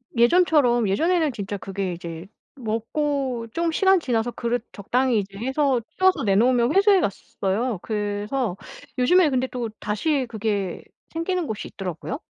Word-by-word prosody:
예전처럼 240 - +4
예전에는 320 - +2
진짜 205 -1 -4
그게 195 -1 -4
이제 170 0 -7 0.3
먹고 255 +1 -2
좀 335 -1 0
시간 380 +2 +4
지나서 240 -5 -1
그릇 235 -1 -2
적당히 240 +3 +1
이제 195 0 -6
해서 265 +1 +1 0.2
씌워서 375 -8 +3
내놓으면 235 - +3
회수해 400 0 +6
갔었어요. 200 +2 -2
그래서 210 +1 -2 0.4
요즘에 315 +6 +5
근데 260 -1 0
또 245 -3 -4
다시 265 +7 0
그게 205 -4 -2 0.3
생기는 335 +1 -1
곳이 215 -1 -4
있더라고요. 190 - -5
240 Hz, 330 characters per minute, -24 LUFS, 205-295 Hz, 0.4 s, 회수해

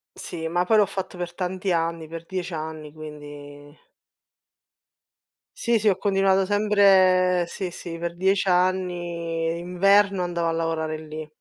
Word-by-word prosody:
Sì, 165 -1 -6
ma 175 +2 0
poi 220 +4 +4
l'ho 210 - +5
fatto 190 -1 -5
per 175 -1 -5
tanti 185 0 -2
anni, 165 -1 -1
per 165 +1 -8
10 185 +1 -4
anni, 155 -1 -6
quindi 145 -1 -11 1.8
Sì 235 -2 +2
sì, 215 0 +3
ho 190 - +1
continuato 195 -1 +2
sempre 190 -3 +4
sì, 180 +1 -5
sì, 170 -1 -7
per 170 0 -4
10 190 +2 +1
anni, 175 -3 0
inverno 195 +3 +3
andavo 170 -1 -1
a - - +1
lavorare 160 -1 -2
lì. 155 0 -8
175 Hz, 140 wpm, -24 LUFS, 165-190 Hz, 1.8 s, l'ho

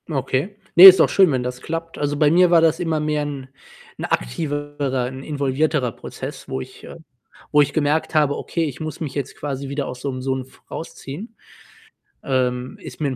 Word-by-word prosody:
Okay. 145 +5 -2 0.2
Ne, 180 - +11
ist 190 -1 +12
doch - - +5
schön, 190 -5 +4
wenn 130 -2 0
das 125 0 -5
klappt. 165 +2 -5
Also, 145 0 -1
bei 150 -1 +4
mir 180 +1 +5
war 170 -1 +5
das 165 +1 +3
immer 165 -3 -1
mehr 150 0 -1
‘n 140 -3 -6 0.5
‘n - - -4
aktivere 145 - -2
‘n 130 +1 -7
involvierterer 140 -2 0
Prozess, - - -8
wo 65 - -3
ich, - - -12
äh - - -10 0.6
wo 150 - +5
ich 145 - 0
gemerkt 155 +1 0
habe: 145 -2 +3
„Okay, 170 - -2
ich 140 -5 -6
muss 155 0 -6
mich 150 -5 -5
jetzt 140 -3 -4
quasi 140 -1 -5
wieder 140 0 -3
aus 125 0 -7
so‘m 130 -2 -4
so 135 +1 -1
'n 130 - -3
f 130 - -21
rausziehen.” 165 - -8 0.9
Ähm, 125 -1 -1
ist - - -10
mir 150 - 0
‘n 130 - -4
145 Hz, 205 wpm, -21 LUFS, 130-160 Hz, 0.9 s, ist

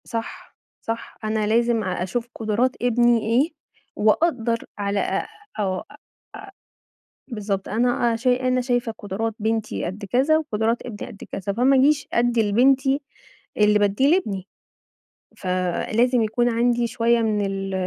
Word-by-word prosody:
صح، 230 0 -6 0.3
صح 225 0 -5
أنا 215 -1 0
لازم 230 0 +2
أ 185 -2 -2
أشوف 230 +6 -3
قُدرات 225 +4 0
ابني 240 -1 +3
إيه، 245 +10 +1 0.4
وأقدّر 230 0 +1
على 200 0 -1
أ - - -1 0.3
آه، 190 -3 0
أ - - -13
أ - - -15 1.3
بالضبط 205 -5 -3
أنا 240 +1 +1
أ - - 0
ش 230 +3 -4
أنا 255 0 +2
شايفة 245 -2 0
قٌدرات 215 +3 -3
بنتي 220 0 -2
قد 195 +4 -5
كذا 265 +10 +3
وقُدرات 230 -6 -1
ابني 215 -4 -7
قد 200 - -11
كذا 200 +1 -3
فما 255 +5 +3
اجيش 290 +3 +3
أدِّي 235 -3 +2
لبنتي، 270 +4 +3 0.6
اللي 210 0 +4
باديه 205 +6 +2
لابني، 200 - -3 0.9
فلازم 190 +7 0
يكون 225 +3 +1
عندي 240 0 +1
شويّة 235 0 +2
من 210 -2 0
ال 195 0 -3
230 Hz, 140 wpm, -23 LUFS, 210-245 Hz, 1.3 s, اللي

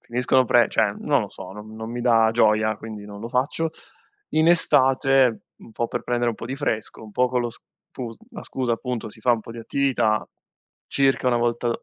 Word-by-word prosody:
finiscono 125 +2 +1
pre 120 0 +4
cioè, 105 -3 +1
non 140 -3 +2
lo 105 - -6
so, 95 0 -10
non 105 +1 -10
non 110 +1 -6
mi 120 - -4
dà 115 -2 +4
gioia, 110 -1 +3
quindi 110 -2 -8
non 100 0 -9
lo 115 - -5
faccio. 140 +6 0 0.6
In 160 +1 +3
estate 135 -7 +3 0.2
un 115 - -15
po' 115 +1 -1
per 120 - -3
prendere 120 -1 0
un - - -5
po' - - -7
di 135 +2 -4
fresco, 110 -7 -3
un 105 -1 -12
po' 125 +3 +2
con 125 -1 0
lo 120 - -2
stus 115 0 -10
la - - -8
scusa, 125 -3 -2
appunto, 120 -1 -3
si 110 - -14
fa 120 +2 +3
un 115 - 0
po' 115 - -10
di 115 - -9
attività, 120 -4 0 0.6
circa 135 -1 +1
una 120 - +2
volta 120 0 0
120 Hz, 215 wpm, -23 LUFS, 110-130 Hz, 0.6 s, pre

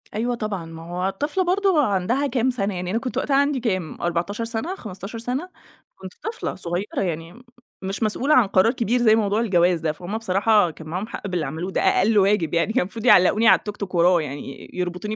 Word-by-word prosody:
أيوه 240 +3 -1
طبعًا، 210 -6 -4
ما 165 0 -10
هو 180 +2 -1
طفلة 295 - -1
برضه 370 -4 +2
عندها 210 +9 0
كام 255 -1 +1
سنة 205 -5 -1
يعني، 180 0 -4
أنا 225 - 0
كنت 255 -1 -5
وقتها 275 - +1
عندي 280 -1 +2
كام؟ 185 -9 -3
14 175 +6 -2
سنة، 230 +11 -3
15 210 - -8
سنة، 255 +10 -3 0.5
كنت 190 -1 -10
طفلة 445 +1 -4
صغيرة 175 +4 -3
يعني، 170 +5 -5 0.4
مش 195 +4 -3
مسؤولة 260 +8 +2
عن 240 -6 +5
قرار 195 +6 +3
كبير، 245 0 0
زي 220 -2 +5
موضوع 210 -1 +1
الجواز 180 -5 +2
ده، 160 -1 -1
فهُم 175 +7 -5
بصراحة 205 -3 +2
كان 155 +1 -12
معاهم 185 +7 -4
حق 205 - -6
باللي 180 -4 -2
عملوه، 165 +7 -4
ده - - 0
أقل 205 +3 +3
واجب 195 -4 +2
يعني، 170 +6 +1
كان 260 - +3
المفروض 215 +5 -5
يعلقوني 220 +1 +5
على - - +7
التوك 210 0 -7
توك 190 -3 -5
وراه 175 0 +4
يعني، 140 -1 -7
ي - - -17
يربطوني 180 +4 -3
205 Hz, 210 wpm, -23 LUFS, 180-235 Hz, 0.5 s, على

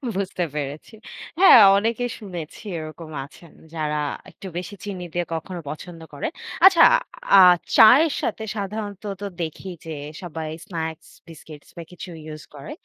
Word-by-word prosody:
বুঝতে 190 -2 -2
পেরেছি। 145 +8 -5 0.5
হ্যাঁ 375 -11 +9 0.2
অনেকেই 230 +3 -1
শুনেছি 175 -6 -8 0.2
এরকম 155 +1 -9 0.2
আছেন 165 +3 -17 0.2
যারা 150 -1 -2 0.3
একটু 195 - -11
বেশি 185 +3 -6
চিনি 190 -3 -6
দিয়ে 175 -1 -1
কখনো 175 +2 -5
পছন্দ 165 +1 -9
করেন। 145 - -4 0.3
আচ্ছা 345 -4 +8 0.5
আ - - +9 0.4
চায়ের 275 +8 +7
সাথে 220 - -3
সাধারণত 205 0 -5 0.2
তো - - -4 0.2
দেখি 165 +4 -5 0.2
যে 160 - -6 0.3
সবাই 160 -3 -6 0.2
স্ন্যাক্স, 160 -5 -5 0.2
বিস্কিটস 155 -2 -13
বা 170 - -6
কিছু 180 +1 -9
ইউস 155 -1 -9
করে। 140 +1 -9
175 Hz, 140 wpm, -23 LUFS, 155-205 Hz, 0.5 s, হ্যাঁ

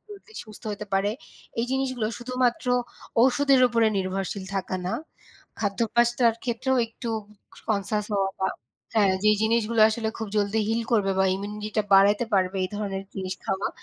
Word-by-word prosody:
জলদি 415 +1 -13
সুস্থ 215 -2 -14
হতে 210 +1 -6
পারে। 195 +1 +2 0.5
এই 230 - +2
জিনিসগুলো 260 -4 -1
শুধুমাত্র 250 0 0 0.6
ওষুধের 270 +1 +4
উপরে 230 -1 +3
নির্ভরশীল 190 +1 -2
থাকা 190 -1 -2
না, 185 - -1 0.7
খাদ্যপ্যাস্তার 235 +3 +2
ক্ষেত্রেও 255 +2 0
একটু 230 +1 -8 0.6
কনসিয়াস 210 0 0
হওয়া 195 -1 +1
বা 190 - +2 0.5
হ্যাঁ 205 -3 +4
যেই 210 0 +5
জিনিসগুলো 225 0 +2
আসলে 220 0 -2
খুব 220 - -3
জলদি 205 +1 +1
হিল 225 +1 +1
করবে 200 -4 +3
বা 190 - +4
ইমিউনিটিটা 210 +2 -3
বাড়াতে 200 +4 +5
পারবে 190 0 +1
এই - - -3
ধরনের 195 -2 -3
জিনিস 190 -1 -3
খাওয়া 190 +1 -1
215 Hz, 150 wpm, -26 LUFS, 195-235 Hz, 0.7 s, যেই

